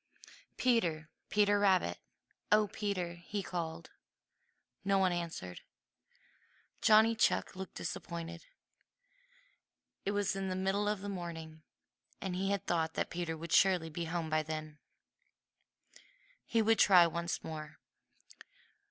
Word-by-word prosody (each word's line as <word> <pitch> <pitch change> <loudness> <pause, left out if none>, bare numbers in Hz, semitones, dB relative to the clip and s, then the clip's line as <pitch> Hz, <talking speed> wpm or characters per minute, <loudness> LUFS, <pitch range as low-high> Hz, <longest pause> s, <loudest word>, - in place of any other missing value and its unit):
"Peter! 170 -11 +1 0.2
Peter 205 0 +3
Rabbit! 185 - +2 0.5
Oh, 210 0 +6
Peter!" 195 -4 -3
he 195 +4 -4
called. 170 -2 -5 0.9
No 195 0 +2
one 190 -1 +3
answered. 165 - -5 1.2
Johnny 220 +1 +6
Chuck 225 - +1
looked 190 -1 -7
disappointed. 170 0 -6 1.6
It 200 - -1
was 205 -1 +1
the 195 - -3
middle 190 +2 0
of 210 -2 -2
the 205 - -5
morning, 165 -4 -6 0.6
and 190 -2 -3
he 195 +2 -1
had 200 -1 -1
thought 160 -2 0
that - - -1
Peter 170 -2 -3
would 165 +1 -8
surely 180 -4 +4
be 170 +1 -4
at - - -6
home 165 -2 -2
then. 155 -1 -2 1.7
He 230 -2 +2
would 225 +1 +3
try 180 -4 +8
once 170 +1 -2
more. 155 -1 -7
175 Hz, 120 wpm, -33 LUFS, 165-200 Hz, 1.7 s, try